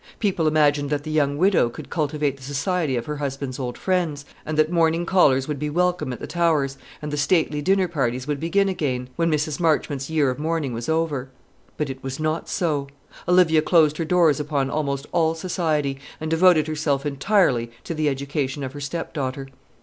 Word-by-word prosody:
People 185 -7 0
imagined 145 -2 +2
that 145 -1 -1
the 155 - -5
young 145 -2 +1
widow 180 -8 +3
would - - -9
cultivate 150 -3 -1
the 135 - -19
society 145 +2 -1
of 120 -1 -2
her 150 0 -4
husband's 135 -2 -4
old 125 -2 -4
friends, 170 -7 -1 0.2
and 155 0 -2
that 155 +1 +3
morning 165 0 +2
callers 140 -8 +3
would 150 -2 -3
be 150 +1 -2
welcome 175 -3 0
at 125 - -6
the - - -5
Towers, 155 -6 +1 0.3
and 150 - -4
the - - -1
stately 150 -1 +1
dinner 190 +3 +2
parties 130 -6 -1
would 145 -1 -2
begin 195 +5 +1
again, 130 -9 -2
when 170 0 +1
Mrs. 150 -1 -1
Marchmont's 150 -4 0
year 150 -4 +2
of 125 - -6
mourning 155 -4 -1
was 115 +3 -4
over. 155 -5 -1 0.5
But 150 -3 -1
it 130 - -10
was 135 +1 -5
not 155 +1 -2
so; 150 -5 -1 0.4
Olivia 175 -3 +5
closed 155 -2 +3
her 165 - -1
doors 165 -4 +3
upon 140 -2 -1
almost 140 -2 -2
all 165 -2 +2
society, 155 -5 -1 0.2
and 155 0 -4
devoted 165 -2 +5
herself 150 -2 -1
entirely 140 - +2
to - - -4
the 155 -2 +1
education 140 0 -3
of 130 0 -5
her 145 - -8
stepdaughter. 140 -3 -4
150 Hz, 195 wpm, -23 LUFS, 140-165 Hz, 0.5 s, Olivia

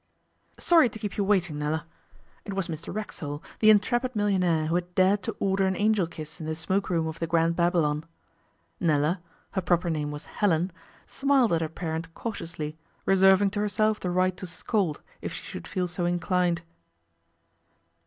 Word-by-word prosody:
'Sorry 330 -8 +5
to 220 - -9
keep 210 -2 -5
you 205 - +1
waiting, 180 -7 +1
Nella.' 150 +1 -1 0.6
It 200 - -5
was 195 -3 0
Mr 160 -1 -5
Racksole, 150 -8 -5 0.2
the 215 - +6
intrepid 240 +4 +3
millionaire 180 -6 +2
who 160 - -1
had 175 0 -2
dared 190 +2 +4
to - - -4
order 195 0 +2
an 190 - 0
Angel 205 -3 +2
Kiss 155 -1 -8
in 155 - -5
the 160 - -2
smoke 190 +5 -1
room 165 -3 +1
of 160 0 -5
the 165 - -1
Grand 165 0 +2
Babylon. 165 -3 +1 0.7
Nella 160 +2 +2 0.3
her 190 - -1
proper 175 -1 +1
name 150 -2 -1
was 150 0 -6
Helen 180 -3 +1 0.3
smiled 270 -6 +2
at 165 - +2
her 160 - -1
parent 165 0 -4
cautiously, 165 -8 -5 0.3
reserving 190 +1 +5
to 205 - -3
herself 210 +1 +1
the 180 - -2
right 185 +1 +2
to 185 - -6
scold 175 -2 -1 0.2
if - - -4
she - - -7
should 85 - -8
feel 180 -1 -1
so 175 0 -2
inclined. 175 0 +1
180 Hz, 175 wpm, -27 LUFS, 160-200 Hz, 0.7 s, the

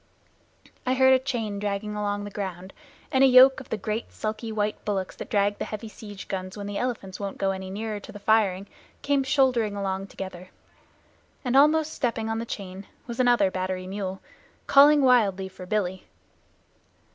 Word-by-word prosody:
I 255 +1 +1
heard 260 0 +6
a 260 - +5
chain 230 -6 -3
dragging 205 +1 -3
along 205 -1 -2
the 205 - -7
ground, 190 -2 -6 0.4
and 265 0 +4
a - - +8
yoke 260 +1 +7
of 260 - -12
the 220 - -2
great 215 +3 -4
sulky 220 +1 -4
white 210 -1 -2
bullocks 195 -3 -2
that - - -7
drag 205 -3 +1
the - - -2
heavy 215 +1 -6
siege 205 -2 -10
guns 185 0 -5
when 205 - -5
the 200 0 -3
elephants 225 -7 -4
won't 200 -1 -5
go 195 0 +1
any 190 0 -5
nearer 210 +2 -4
to - - -11
the - - -9
firing, 200 -2 +2 0.4
came 285 -1 +2
shouldering 255 -6 +2
along 195 -1 -3
together. 185 -2 -8 1.0
And 250 +1 0
almost 305 +3 +4
stepping 230 -3 -2
on 225 - -1
the 230 - -5
chain 195 -2 -7 0.2
was 235 0 -7
another 240 -6 +4
battery 185 0 -3
mule, 190 0 -5 0.4
calling 290 +1 +6
wildly 205 -7 +3
for 185 -1 -11
"Billy." 190 -2 -2
210 Hz, 180 wpm, -26 LUFS, 195-245 Hz, 1.0 s, a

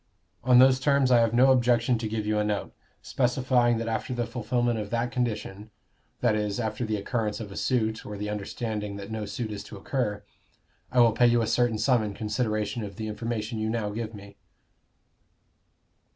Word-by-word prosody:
On 125 0 +5
those 130 +1 +6
terms 140 -1 +3
I 120 - +6
have 115 -1 +3
no 130 +3 +5
objection 120 -1 +3
to 110 - -3
give 110 0 -3
you 105 0 +1
a - - +2
note, 105 -1 -2 0.3
specifying 125 -2 +2
that 115 0 -3
after 115 +2 -2
the 120 -1 -1
fulfilment 120 0 -1
of 105 -1 -5
that 120 +1 -1
condition 110 -4 -3 0.5
that 120 -3 +3
is, 105 -1 -1
after 110 +1 -2
the 110 -2 -1
occurrence 105 +1 -2
of 105 -3 -7
a - - -9
suit, 110 -4 0
or 105 0 -7
the 105 +1 -4
understanding 105 0 -4
that 100 +1 -8
no 110 -1 -4
suit 115 0 -4
is 100 -1 -6
to 105 - -10
occur 105 -2 -2 0.7
I 125 -1 +4
will 115 -1 +6
pay 120 +2 +4
you 120 -1 +3
a - - +1
certain 115 0 +1
sum 125 +1 +3
in 105 -2 -3
consideration 110 0 -2
of 100 -2 -7
the 110 +2 -5
information 110 +1 -3
you 110 0 -1
now 110 -2 -2
give 110 +1 -5
me!" 100 0 -12
110 Hz, 195 wpm, -27 LUFS, 105-120 Hz, 0.7 s, those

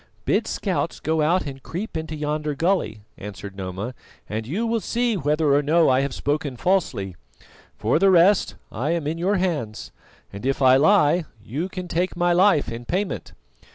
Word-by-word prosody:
"Bid - - +1
scouts - - -2
go 160 +1 0
out 170 +4 +2
and 135 -2 -7
creep 185 +9 -6
into 160 0 -4
yonder 150 0 -2
gully," 165 - 0 0.2
answered 100 -1 -8
Noma, 95 +5 -5 0.3
"and 110 +1 -4
you 200 - -1
will 230 0 0
see 235 +1 0
whether 150 -3 +1
or 145 - +4
no 160 +3 +3
I 130 +1 +3
have 140 0 -2
spoken 145 -2 -2
falsely. 120 - 0 0.6
For 115 +8 +1
the 195 +1 +5
rest, 185 +2 +4 0.2
I 130 +7 -2
am 170 -3 -2
in 160 +3 -2
your 190 +4 +1
hands, 155 - -2 0.4
and 100 - -8
if 135 +1 0
I 130 -1 +6
lie 165 +1 +4 0.2
you 150 - -3
can 185 -1 -6
take 175 +1 -1
my 175 0 +3
life 175 - +3
in 115 +1 -6
payment." 185 +10 -3
155 Hz, 180 wpm, -23 LUFS, 130-180 Hz, 0.6 s, I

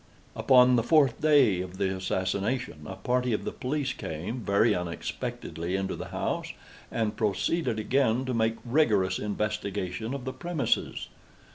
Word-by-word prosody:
Upon 125 -1 +5
the - - +3
fourth 140 -1 +3
day 135 -12 +4
of 90 0 -7
the 95 -1 0
assassination, 95 0 -2
a 95 - -6
party 125 +4 0
of 105 - -1
the - - -2
police 135 0 -2
came, 85 +9 -5
very 105 +1 +3
unexpectedly, 85 0 -4
into 95 0 -2
the - - -6
house, - - -3 0.4
and 110 -2 -1
proceeded 110 - 0
again 125 +2 +1
to 130 - -2
make 110 -1 +1
rigorous 110 -9 +2
investigation 105 +1 -3
of 135 -2 -6
the 130 - -3
premises. 160 -9 -1
110 Hz, 145 wpm, -28 LUFS, 95-130 Hz, 0.4 s, Upon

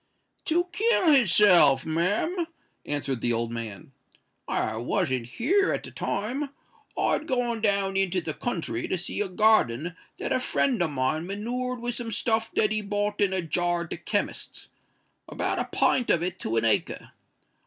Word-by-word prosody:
"To 345 +2 +2
kill 400 -3 +3
his 250 - +5
self, 175 -9 +6
ma'am," 205 - 0 0.4
answered 140 -4 -2
the 120 - +1
old 115 0 -1
man. 115 +5 -7 0.6
"I 110 - -1
wasn't 130 - -1
here 375 - +1
at - - -2
the - - -9
time: 255 +8 -3 0.5
I'd 310 - 0
gone 240 -4 -1
down 200 -2 +1
into 190 -1 +1
the 160 -3 -4
country 160 - -3
to 185 - -1
see 180 - -2
a 210 - 0
garden 180 - +2 0.2
that - - -2
a - - +2
friend 255 -3 +1
o' 175 - +3
mine 155 +4 -1
manured 245 +5 -3
with 240 0 -2
some 235 -1 -3
stuff 225 +1 0
that 210 -1 +2
he 215 0 0
bought 205 0 -2
in 200 -2 +3
a 190 -2 -1
jar 175 +1 0
at 170 - -12
the - - -3
chemist's—about 205 +5 -5
a - - -1
pint 250 - +1
of 170 - +3
it 180 +1 -3
to 115 - -2
a 115 - +2
acre. 110 - 0
195 Hz, 170 wpm, -26 LUFS, 155-235 Hz, 0.6 s, self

